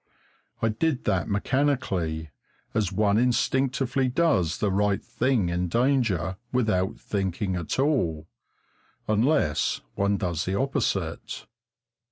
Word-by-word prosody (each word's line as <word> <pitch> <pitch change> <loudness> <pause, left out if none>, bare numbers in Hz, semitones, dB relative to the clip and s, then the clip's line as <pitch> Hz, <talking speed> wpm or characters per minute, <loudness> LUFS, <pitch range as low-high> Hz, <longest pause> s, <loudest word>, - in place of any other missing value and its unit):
I 115 - +4
did 135 +5 0
that 95 -7 0
mechanically, 100 - 0 0.4
as 105 -4 0
one 100 +2 +2
instinctively 130 +2 +1
does 125 - +2
the 105 -2 0
right 100 +1 +2
thing 120 -5 +1
in 90 +1 -1
danger 110 - +1
without 110 -7 0
thinking 95 -1 -2
at 85 -3 -3
all 105 - +1 0.8
unless 110 - +2
one 100 0 +1
does 85 -4 -2
the 95 - -1
opposite. 115 - -2
105 Hz, 110 wpm, -26 LUFS, 90-130 Hz, 0.8 s, I